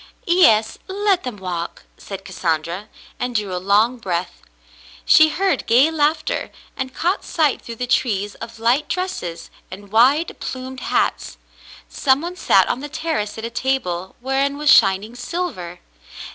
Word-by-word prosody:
"Yes, 225 -12 +4
let 395 -1 +1
them 250 -8 -6
walk," 175 -3 -5
said 195 -1 -9
Cassandra, 170 +2 -2 0.3
and 250 -1 -3
drew 205 -4 -1
a 180 - -3
long 210 +6 +3
breath. 180 -4 -3 0.6
She 315 0 +7
heard 385 +5 0
gay 260 +7 +5
laughter, 320 +10 0 0.3
and 260 0 -4
caught 360 +4 0
sight 305 -5 +1
through 230 - -8
the 250 - -3
trees 205 -5 0
of 230 0 -9
light 245 +6 +1
dresses 335 - -4 0.2
and 200 +1 -11
wide, 265 +9 +3
plumed 260 0 -6
hats. - - -1 0.5
Some 265 0 +2
one 345 +2 -5
sat - - +4
on - - -1
the 290 +2 -7
terrace 305 -10 -3
at 220 - -5
a 230 - -5
table 190 -9 -2
whereon 270 +2 0
was 295 -1 +3
shining 195 +4 +4
silver. 245 - -5
245 Hz, 150 wpm, -20 LUFS, 200-300 Hz, 0.6 s, She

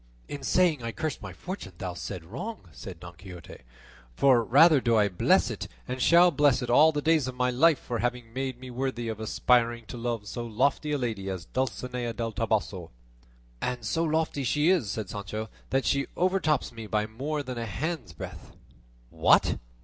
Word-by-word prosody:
"In 145 - -6
saying 175 -7 +2
I 115 0 -3
cursed 155 +3 -4
my 95 -3 -7
fortune 100 - -7
thou 90 -1 -4
saidst 90 -1 -6
wrong," 180 - -7
said 95 -6 -9
Don 85 +1 -10
Quixote; 90 -2 -11 0.6
"for 130 -4 +4
rather 145 +5 +6
do 115 -1 +2
I 105 -1 +4
bless 90 - +3
it - - -5 0.2
and 130 +1 -4
shall 175 +5 +6
bless 140 -3 +3
it 120 - -2
all 155 +6 +7
the 145 -2 -3
days 160 -4 +3
of 130 - -5
my 125 0 +1
life 155 +5 +4
for 120 -2 -4
having 120 -1 -3
made 130 -1 -3
me 130 0 -9
worthy 125 -2 -3
of 110 -1 -5
aspiring 115 +1 +1
to 120 - -8
love 115 -3 -3
so 120 +3 -5
lofty 135 +6 0
a - - +1
lady 110 -7 -3
as 95 -2 -5
Dulcinea 125 0 -3
del 115 0 -3
Toboso." 105 -6 -2 0.7
"And 125 -2 -3
so 165 +9 0
lofty 155 -3 0
she 150 +6 +3
is," 165 - +1
said 110 0 -3
Sancho, 105 +2 -5 0.2
"that 135 0 +1
she 140 0 +1
overtops 180 -6 +1
me 115 -2 -8
by 105 0 0
more 140 +7 -3
than 125 -3 -5
a 115 - -3
hand's 140 - -4
breadth." 90 -2 -9 0.6
"What! - - +3
120 Hz, 190 wpm, -27 LUFS, 110-145 Hz, 0.7 s, all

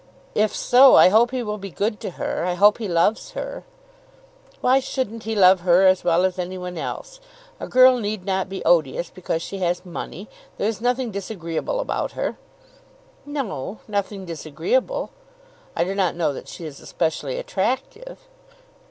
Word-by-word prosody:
"If 215 0 +1
so 260 +2 +6
I - - +8
hope 225 +5 +4
he 255 -1 -3
will 210 -1 -4
be 195 0 -7
good 210 +3 -2
to - - -5
her. - - -2
I 180 0 -1
hope 205 +4 +5
he 220 - -3
loves 175 +5 +1
her." - - -6 0.9
"Why 260 +2 +4
shouldn't 230 -4 -4
he 220 0 -2
love 190 -2 +6
her 180 +2 +4
as 185 0 +4
well 175 +1 +3
as 185 0 -2
any 180 +1 -4
one 180 0 -6
else? - - -6 0.4
A - - -5
girl 255 0 +6
need 210 -3 -4
not 190 -1 -1
be 190 0 -6
odious 165 0 +2
because 170 -2 -3
she 195 - -6
has 180 0 -1
money. 180 +2 -7 0.3
There 205 - 0
is 220 -1 -3
nothing 245 0 0
disagreeable 190 - -4
about - - -2
her." - - -3 0.9
"No, 220 - -4
nothing 200 -2 -3
disagreeable. 180 - -2 0.6
I 170 - +2
do 185 +3 -2
not 190 -3 0
know 165 -4 0
that - - -9
she 170 - -9
is 145 -3 -8
especially 150 -4 -2
attractive." 265 - -3
195 Hz, 170 wpm, -22 LUFS, 175-235 Hz, 0.9 s, I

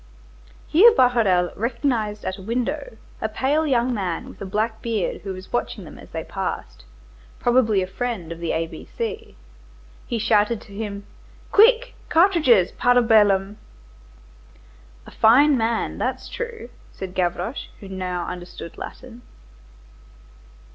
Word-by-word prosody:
Here 415 +10 +7
Bahorel 225 - +3
recognized 230 -2 -1
at 185 +1 -3
a - - -9
window 245 +4 -3 0.2
a 220 - -1
pale 290 +8 0
young 250 -2 +2
man 185 -6 -3
with - - -14
a 195 - -4
black 220 +3 -2
beard 225 -5 -2
who 195 - -5
was 185 0 -9
watching 240 - -2
them - - -12
as - - -13
they - - -5
passed, - - -5 0.5
probably 235 -5 +3
a - - -2
Friend 190 -4 -4
of 170 - -6
the 170 -1 -2
A 165 +1 0
B 165 - -11
C. 450 -1 -4 0.7
He 235 - -2
shouted 215 0 +2
to 200 - -15
him:— 200 -1 -5 0.5
"Quick, 475 +3 +5 0.2
cartridges, 320 - +4
para 245 0 +3
bellum." 205 -3 +3 1.5
"A - - -12
fine 275 +7 +5
man! 230 -1 -1
that's - - -2
true," 470 - -6 0.2
said 185 -1 -7
Gavroche, 185 +7 -2
who 200 - -10
now 180 -2 -3
understood 175 -2 -8
Latin. 245 -1 -9
225 Hz, 140 wpm, -23 LUFS, 190-255 Hz, 1.5 s, Here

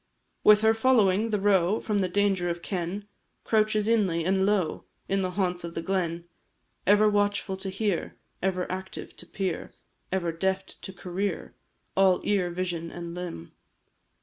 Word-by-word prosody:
With 210 0 +7
her 220 0 +5
following, 225 -3 +3
the 210 -2 0
roe 195 0 +3
From 210 -2 -1
the 190 - +1
danger 195 -2 +1
of 170 0 -4
ken 190 +2 -3 0.4
Couches 215 -1 +2
inly, 190 -8 +2
and 190 +1 +2
low, 195 -6 0 0.2
In 195 0 +1
the 185 - 0
haunts 180 -3 0
of 170 0 -6
the 165 - -2
glen; 170 -3 -1 0.6
Ever 205 +2 +6
watchful 205 -1 +1
to 190 0 -3
hear, 195 -2 -2 0.3
Ever 185 -1 0
active 190 0 -6
to - - -11
peer, 190 -4 -3 0.4
Ever 180 -3 0
deft 190 +3 -2
to - - -6
career, 185 0 -4 0.4
All 190 -1 +4
ear, 195 -4 +1
vision, 175 -2 -3
and 170 0 -7
limb. 175 - -6
190 Hz, 155 wpm, -27 LUFS, 175-205 Hz, 0.6 s, With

